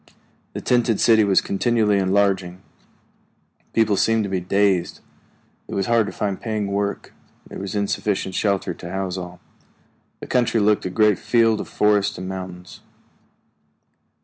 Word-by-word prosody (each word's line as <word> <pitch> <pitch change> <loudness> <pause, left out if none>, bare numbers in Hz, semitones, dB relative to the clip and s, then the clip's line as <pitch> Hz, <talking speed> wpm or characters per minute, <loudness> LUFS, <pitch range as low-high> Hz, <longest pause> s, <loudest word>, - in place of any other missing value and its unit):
The - - -5
tented 120 -3 +1
city 110 -2 +5
was 100 -2 +3
continually 105 -1 +1
enlarging. 95 -1 0 1.1
People 110 -2 +2
seemed 115 +2 +2
to 100 - -4
be 95 - 0
dazed; 95 0 0 0.7
it - - -6
was 95 - 0
hard 115 -1 +2
to - - -5
find 100 -3 -3
paying 110 -2 -2
work; 100 0 -3 0.3
there - - -9
was 95 +1 -5
insufficient 100 -1 -1
shelter 100 -2 0
to 85 - -10
house 95 -1 -3
all. 90 -1 -7 0.8
The - - -8
country 120 -2 +1
looked 105 -2 +2
a - - -4
great 105 0 +2
field 115 0 +2
of - - -8
forests 105 0 +1
and 95 +1 -6
mountains. 90 -1 -8
100 Hz, 150 wpm, -22 LUFS, 95-110 Hz, 1.1 s, city